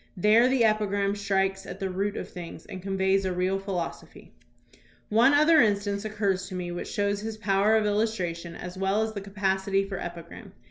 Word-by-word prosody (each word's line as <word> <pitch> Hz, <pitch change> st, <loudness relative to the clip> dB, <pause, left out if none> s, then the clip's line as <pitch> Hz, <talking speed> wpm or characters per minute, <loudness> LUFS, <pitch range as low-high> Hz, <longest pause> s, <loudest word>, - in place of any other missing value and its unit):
There 215 Hz, +6 st, +5 dB
the 260 Hz, -2 st, +2 dB
epigram 205 Hz, -2 st, +1 dB
strikes 195 Hz, -1 st, -1 dB
at -, -, -8 dB
the 190 Hz, -1 st, -2 dB
root 200 Hz, +2 st, -2 dB
of -, -, -5 dB
things 170 Hz, -2 st, -9 dB
and 185 Hz, -, -8 dB
conveys 195 Hz, 0 st, +1 dB
a 190 Hz, -, -1 dB
real 185 Hz, +2 st, 0 dB
philosophy. 190 Hz, -4 st, -6 dB, 0.8 s
One 230 Hz, +5 st, +5 dB
other 310 Hz, +2 st, +6 dB
instance 205 Hz, -1 st, 0 dB
occurs 200 Hz, -3 st, -1 dB
to 185 Hz, -, -7 dB
me 180 Hz, -1 st, -4 dB
which 175 Hz, -, -5 dB
shows 205 Hz, 0 st, 0 dB
his 220 Hz, 0 st, -5 dB
power 205 Hz, +1 st, +2 dB
of 220 Hz, -1 st, +2 dB
illustration 190 Hz, -6 st, -1 dB
as 180 Hz, +1 st, -7 dB
well 195 Hz, +3 st, +1 dB
as 220 Hz, 0 st, -3 dB
the 200 Hz, -, -5 dB
capacity 195 Hz, 0 st, 0 dB
for 195 Hz, -2 st, -5 dB
epi 170 Hz, -1 st, -6 dB
gram. 195 Hz, +4 st, -12 dB
195 Hz, 190 wpm, -27 LUFS, 190-210 Hz, 0.8 s, other